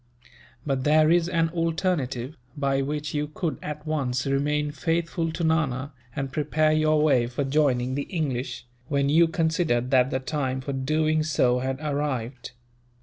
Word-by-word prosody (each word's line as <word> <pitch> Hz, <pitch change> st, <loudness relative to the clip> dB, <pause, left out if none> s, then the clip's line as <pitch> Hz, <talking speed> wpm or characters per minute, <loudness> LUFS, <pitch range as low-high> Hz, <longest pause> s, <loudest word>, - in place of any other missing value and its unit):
But 135 Hz, -3 st, -1 dB
there 155 Hz, +2 st, +4 dB
is 170 Hz, 0 st, +3 dB
an 165 Hz, -2 st, +1 dB
alternative, 160 Hz, -6 st, -1 dB, 0.2 s
by 135 Hz, -1 st, +1 dB
which 150 Hz, +2 st, -3 dB
you 150 Hz, 0 st, -1 dB
could 155 Hz, +2 st, -3 dB
at 150 Hz, 0 st, -6 dB
once 130 Hz, -5 st, -1 dB
remain 145 Hz, +2 st, 0 dB
faithful 165 Hz, +2 st, -1 dB
to 170 Hz, -, -3 dB
Nana, 145 Hz, -4 st, 0 dB, 0.2 s
and 135 Hz, -1 st, -3 dB
prepare 155 Hz, +2 st, +1 dB
your 155 Hz, 0 st, +3 dB
way 130 Hz, -6 st, +3 dB
for 125 Hz, +4 st, -2 dB
joining 135 Hz, -3 st, +1 dB
the 140 Hz, +1 st, -3 dB
English, 130 Hz, -8 st, -3 dB, 0.2 s
when 140 Hz, -1 st, +1 dB
you 165 Hz, +3 st, +5 dB
considered 160 Hz, -7 st, 0 dB
that 130 Hz, -1 st, +4 dB
the 130 Hz, -, -1 dB
time 130 Hz, -1 st, -2 dB
for 140 Hz, +2 st, -4 dB
doing 155 Hz, +4 st, +1 dB
so 130 Hz, -5 st, +2 dB
had 130 Hz, +1 st, -2 dB
arrived." 135 Hz, -5 st, -3 dB
145 Hz, 155 wpm, -25 LUFS, 130-155 Hz, 0.2 s, you